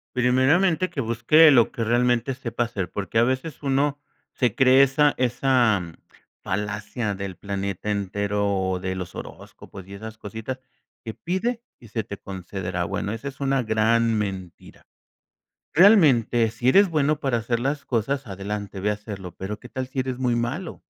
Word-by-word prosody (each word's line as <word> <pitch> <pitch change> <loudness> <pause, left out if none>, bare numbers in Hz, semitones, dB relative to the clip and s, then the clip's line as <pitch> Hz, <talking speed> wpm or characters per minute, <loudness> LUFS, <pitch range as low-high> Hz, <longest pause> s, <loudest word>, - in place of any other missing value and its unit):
Primeramente 145 +9 +3
que 155 -5 -3
busque 120 +7 +5
lo 120 -5 +5
que 115 - -3
realmente 120 +2 +1
sepa 120 -2 -3
hacer, 105 -6 -4
porque 100 +2 -2
a - - +5
veces 130 +6 -2
uno 140 +1 0 0.3
se 120 -5 0
cree 130 +1 +6
esa 145 +2 +4
esa 120 -4 +2 0.6
falacia 105 +2 -3
del 95 -2 -6
planeta 100 0 -3
entero 100 0 -1
o 95 -2 0
de 95 0 -3
los 90 -2 -6
horóscopos 95 -1 -10
y 100 - -10
esas 110 +2 -8
cositas 110 +6 -6 0.5
que 110 - -5
pide 220 - -2 0.2
y 120 - -15
se 110 +1 -2
te 100 0 -8
concederá. 95 -2 -5
Bueno, 100 +1 -3
esa 115 +5 -5
es 135 - -8
una 135 -1 +1
gran 115 +1 +2
mentira. 95 -4 -6 0.9
Realmente, 135 - +5
sí 120 +3 0
eres 200 +5 +5
bueno 150 -2 +1
para 135 -5 0
hacer 115 +1 -1
las 140 +3 -2
cosas, 135 +4 -1
adelante, 100 0 -5
ve 100 +2 0
a 105 - +2
hacerlo 100 -4 -8
pero, 100 +3 -5
¿qué 125 - -12
tal 130 -2 -4
si 130 0 -4
eres 130 -1 -2
muy 125 -2 0
malo? 135 +10 -3
115 Hz, 165 wpm, -24 LUFS, 100-135 Hz, 0.9 s, cree